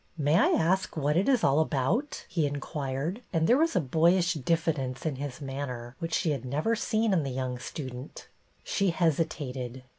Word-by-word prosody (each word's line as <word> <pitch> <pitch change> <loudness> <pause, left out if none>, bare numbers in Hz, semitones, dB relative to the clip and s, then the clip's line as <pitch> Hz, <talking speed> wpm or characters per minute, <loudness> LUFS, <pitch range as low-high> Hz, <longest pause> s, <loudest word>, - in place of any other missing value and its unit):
" - - -34
May - - +5
I 185 - +5
ask 185 +2 +1
what 150 0 +1
it 190 +9 +2
is 255 -5 +3
all 140 +2 +4
about 160 - 0
.I* - - -23
" - - -27
he 160 -4 +2
in 145 0 -3
quired, 145 - -3
and 165 -4 +2
there 240 - +5
was 330 +1 +2
a - - +5
boyish 170 +5 +3
diffidence 150 -4 -1
in 150 -4 -1
his 140 0 -6
manner 130 -3 -5
which 165 -1 -2
she 165 - +1
had 135 -4 -2
never 150 - 0
seen 220 -1 +1
in 175 - +3
the 140 - -3
young 130 -1 -3
student. 130 0 -7 0.4
She 195 -2 +1
hesitated. 145 -7 -1
155 Hz, 205 wpm, -28 LUFS, 135-175 Hz, 0.4 s, May